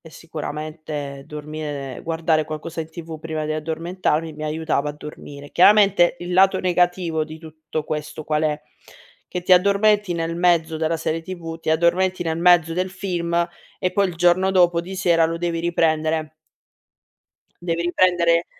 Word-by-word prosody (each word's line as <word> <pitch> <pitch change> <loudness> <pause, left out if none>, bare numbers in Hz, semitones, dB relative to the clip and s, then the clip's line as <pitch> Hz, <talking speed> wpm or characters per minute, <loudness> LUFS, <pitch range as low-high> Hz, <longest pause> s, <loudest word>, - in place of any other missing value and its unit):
e 160 - -14
sicuramente 150 -3 -6
dormire 150 -3 -6
guardare 160 -1 +1
qualcosa 155 +2 -6
in 160 - -6
TV 160 -1 -8
prima 155 -1 -4
di 155 - -3
addormentarmi 160 0 -2
mi 155 +1 -7
aiutava 155 -1 -1
a - - -8
dormire. 145 -1 -10
Chiaramente, 200 -2 +5
il 175 +1 -5
lato 190 +1 +4
negativo 175 -3 +1
di 155 +1 -10
tutto 155 -1 -6
questo 155 0 -5
qual 150 +1 -1
è? 150 0 -1 0.6
Che 180 - -5
ti 185 - +2
addormenti 200 +1 +4
nel 165 0 -2
mezzo 170 -2 +2
della 160 +1 0
serie 160 +1 -2
TV, 165 -2 -7
ti 160 - -8
addormenti 175 +3 +2
nel 160 -1 -2
mezzo 175 -1 +5
del 185 +2 -1
film, 170 -3 -1 0.3
e 185 - +1
poi 200 +2 +2
il 175 - -6
giorno 175 +3 +3
dopo 175 -2 +4
di 185 +3 -8
sera 170 -3 +3
lo 165 +1 -1
devi 170 -1 -2
riprendere. 160 -2 0 1.3
Devi 170 -1 -1
riprendere 175 -1 +3
165 Hz, 160 wpm, -22 LUFS, 155-175 Hz, 1.3 s, Chiaramente